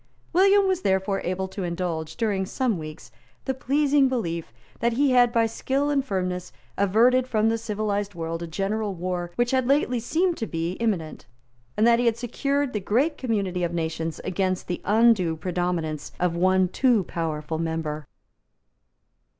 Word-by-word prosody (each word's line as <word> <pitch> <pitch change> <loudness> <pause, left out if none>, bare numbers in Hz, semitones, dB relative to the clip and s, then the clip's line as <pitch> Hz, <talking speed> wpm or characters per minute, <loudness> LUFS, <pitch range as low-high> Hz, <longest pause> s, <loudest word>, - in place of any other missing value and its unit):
William 390 +2 +5
was 375 -1 0
therefore 190 - +1
able 185 +2 -2
to 190 +1 -7
indulge, 170 -2 -3
during 205 -4 0
some 225 0 -1
weeks, 155 -5 -9 0.3
the 265 - 0
pleasing 280 +1 +2
belief 170 - -3 0.3
that 235 0 +1
he 275 +3 +2
had 245 -1 +5
by 230 -2 +3
skill 270 +5 -1
and 280 -2 +2
firmness 185 -6 -3 0.2
averted 235 +6 +3
from 220 -2 +2
the 225 - +1
civilised 205 -2 -2
world 165 0 -4
a 170 - -4
general 200 +4 -2
war 175 0 -3
which 240 0 +1
had 260 -2 +1
lately 270 -3 +2
seemed 335 +9 0
to 225 - -3
be 165 +1 -2
imminent, 190 - -2 0.5
and 215 - +4
that 235 0 +5
he 245 - +2
had 230 -1 +2
secured 275 +3 -1
the 210 - 0
great 250 - +1
community 200 -7 -1
of 170 0 -1
nations 160 -1 -3
against 185 0 -1
the 175 - -3
undue 210 -6 +3
predominance 175 -3 -2
of 175 -1 +1
one 185 +1 +3
too 235 +2 +2
powerful 160 -2 -3
member. 160 -3 -3
200 Hz, 165 wpm, -25 LUFS, 170-245 Hz, 0.5 s, William